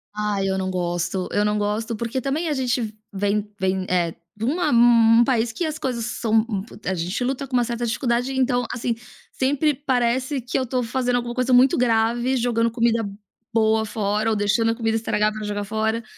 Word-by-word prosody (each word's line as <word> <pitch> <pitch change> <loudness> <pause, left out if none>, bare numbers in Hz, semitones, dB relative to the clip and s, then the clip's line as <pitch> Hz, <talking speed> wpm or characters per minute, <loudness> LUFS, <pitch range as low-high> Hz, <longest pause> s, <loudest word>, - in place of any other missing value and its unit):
Ai 210 -2 -1
eu 190 0 0
não 185 0 -2
gosto, 175 +1 -2
eu 205 0 +1
não 210 0 +1
gosto, 215 +2 -1
porque 235 +3 -3
também 295 +6 -1
a - - +1
gente 245 -4 -1 0.2
vem 205 +1 0
vem, 190 0 0
eh, 175 -2 +1 0.2
de 220 +2 -4
uma 330 +5 +1
um 235 -1 +6
país 235 -3 +1
que 335 +9 -3
as 310 0 -3
coisas 240 -6 -2
são, 225 -1 +1
hum, 195 -3 -2
pu 230 - -14
a 190 - 0
gente 180 +7 -2
luta 270 +2 -2
com 260 - -15
uma 245 - +4
certa 235 0 -3
dificuldade, 240 +2 0
então, 250 -2 +1
assim, 235 -1 -2 0.4
sempre 285 +3 +1
parece 260 0 0
que 250 +3 -2
eu 260 - 0
tô 250 +1 -1
fazendo 245 +1 0
alguma 240 0 -3
coisa 255 0 +1
muito 255 +1 +5
grave, 240 +2 +2
jogando 230 -1 +1
comida 230 -1 +1 0.5
boa 220 -1 +3
fora, 210 +1 -1
ou 220 - +1
deixando 210 +3 +2
a - - -2
comida 225 -1 -1
estragar 215 -1 +1
pra 215 0 -6
jogar 205 0 -3
fora. 220 +2 -1
230 Hz, 205 wpm, -23 LUFS, 210-250 Hz, 0.5 s, um